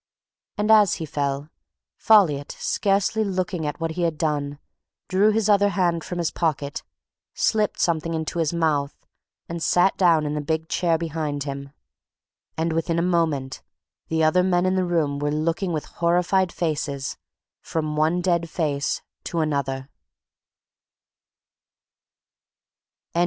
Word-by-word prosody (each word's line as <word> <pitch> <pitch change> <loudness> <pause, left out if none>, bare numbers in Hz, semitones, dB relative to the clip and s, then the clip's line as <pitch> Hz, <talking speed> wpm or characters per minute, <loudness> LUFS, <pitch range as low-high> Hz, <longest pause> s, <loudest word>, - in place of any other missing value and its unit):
And 210 +1 +2
as 210 -3 +6
he 160 - -5
fell, 140 -1 -2 0.5
Folliot, 165 -10 +3
scarcely 200 +2 +1
looking 185 -5 -2
at 145 -1 -4
what 165 -1 -2
he 175 +2 -4
had 165 -3 0
done, 145 -2 -1 0.5
drew 195 +3 +3
his 215 -1 +1
other 205 -1 +4
hand 175 -3 0
from 180 - -5
his 170 -2 0
pocket, 150 -4 -2 0.5
slipped 215 -2 +1
something 165 -1 0
into 160 +2 -3
his 160 -3 +1
mouth 155 -4 0 0.5
and 170 0 -5
sat 180 +4 +3
down 165 -4 +4
in 150 - -2
the 150 - -2
big 160 +2 -2
chair 170 -2 +1
behind 155 -3 -3
him... 140 -1 -6 0.9
and 165 0 0
within 165 +1 0
a 170 - +2
moment 160 -7 0 0.5
the 160 0 0
other 155 +4 +4
men 180 -1 +2
in 185 - +2
the 185 -1 +1
room 155 -5 0
were 145 0 0
looking 165 +5 -1
with 155 -3 -2
horrified 180 +2 +1
faces 145 -4 -2 0.5
from 155 -2 -3
one 160 +4 +2
dead 170 -2 +1
face 145 -4 -1 0.2
to 170 - -2
another. 135 -4 -1
165 Hz, 140 wpm, -24 LUFS, 150-180 Hz, 0.9 s, as